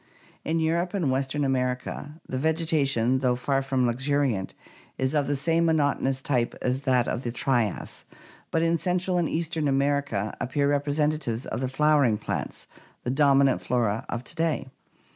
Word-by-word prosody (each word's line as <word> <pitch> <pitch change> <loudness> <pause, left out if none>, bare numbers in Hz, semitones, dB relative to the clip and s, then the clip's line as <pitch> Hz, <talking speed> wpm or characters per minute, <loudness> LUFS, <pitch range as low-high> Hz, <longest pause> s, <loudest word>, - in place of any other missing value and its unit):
In 165 +1 0
Europe 170 +4 0
and 165 -9 +1
western 135 +2 -1
America 130 +3 -2
the 130 - -3
vegetation, 140 -6 +1
though 125 -2 +2
far 135 +2 0
more 135 - 0
luxuriant, 130 -4 0 0.4
is 130 +2 0
of 145 -2 +1
the 145 - +1
same 165 +4 +2
monot 150 -3 +2
onous 135 0 -1
type 125 -4 0
as 130 +1 -1
that 125 -2 +3
of 120 - -2
the 120 - -3
Trias; 120 -3 -1 0.5
but 165 - +1
in 165 0 +2
central 180 0 0
and 170 - 0
eastern 160 -2 -1
America 140 -6 0
appear 140 +3 0
representatives 145 -3 0
of - - -4
the 130 -1 -2
flowering 140 -5 +3
plants, - - -4 0.4
the 125 - -1
dominant 140 -1 +4
flora 115 -4 0
of 120 +1 -3
to - - -6
day. 160 -5 -1
140 Hz, 160 wpm, -26 LUFS, 125-155 Hz, 0.5 s, dominant